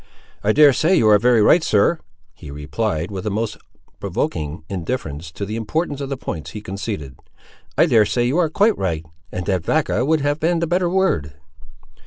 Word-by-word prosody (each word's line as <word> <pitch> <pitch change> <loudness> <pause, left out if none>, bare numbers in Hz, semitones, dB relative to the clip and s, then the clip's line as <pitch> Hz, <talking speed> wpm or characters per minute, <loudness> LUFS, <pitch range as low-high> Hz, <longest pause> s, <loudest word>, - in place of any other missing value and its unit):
"I 105 - +3
dare 145 +2 +6
say 165 +8 +2
you 115 - +3
are 105 -1 +6
very 120 -1 +4
right, 170 - +5
sir," 110 +10 +2 0.3
he 75 - -12
replied, 80 +5 -3
with 95 +1 -5
a - - +2
most 105 +1 -2 0.4
provoking 75 +1 -3
indifference 90 - -4
to 100 - -4
the 105 +2 -5
importance 145 +6 -2
of 140 - -4
the 135 - -3
points 75 - -6
he 105 - -7
conceded. 100 - -6 0.6
"I - - +6
dare 110 -2 +4
say 120 +4 0
you 135 +8 +1
are 165 -3 +2
quite 205 +7 +3
right; 80 -4 -2 0.3
and 90 - -4
that 95 -3 0
vacca 155 - +1
would 155 +2 +2
have 145 +1 0
been 170 +2 +1
the 170 - 0
better 175 +1 +1
word." 170 - 0
110 Hz, 195 wpm, -20 LUFS, 90-150 Hz, 0.6 s, dare